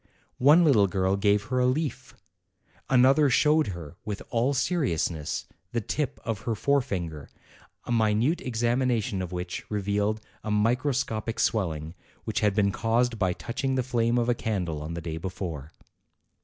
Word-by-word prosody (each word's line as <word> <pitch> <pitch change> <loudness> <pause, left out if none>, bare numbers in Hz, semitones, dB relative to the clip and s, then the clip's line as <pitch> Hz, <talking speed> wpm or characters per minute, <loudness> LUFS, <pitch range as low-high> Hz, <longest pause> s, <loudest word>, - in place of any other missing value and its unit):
One 150 +7 +6
little 110 -10 +5
girl 95 0 +1
gave 100 0 +2
her 130 +3 -1
a 125 - +3
leaf; 145 +3 -2 0.7
another 135 +3 +5
showed 150 +4 +3
her, 85 -3 -7
with 105 -2 -5
all 120 +4 +2
seriousness, 100 - -1 0.3
the 120 - +1
tip 140 +5 -3
of 115 -3 -2
her 115 +1 -2
fore 140 +6 +2
finger, 85 - -5 0.5
a - - -6
minute 115 +7 +2
examination 120 -4 0
of 90 -1 -5
which 90 -1 -4
revealed 105 +1 0 0.2
a - - -4
mi 105 +3 +3
croscopic 120 -4 -2
swelling, 80 -7 0 0.3
which - - -2
had 105 -2 +2
been 100 -2 +3
caused 115 +2 0
by 95 -2 +2
touch 115 - -6
ing 135 -1 +1
the 130 - +1
flame 120 -1 +1
of 120 -1 +1
a 120 - +3
candle 90 -10 -2
on 80 +2 -5
the 85 - -4
day 80 -1 -4
before. 85 -4 -5
110 Hz, 165 wpm, -27 LUFS, 95-125 Hz, 0.7 s, One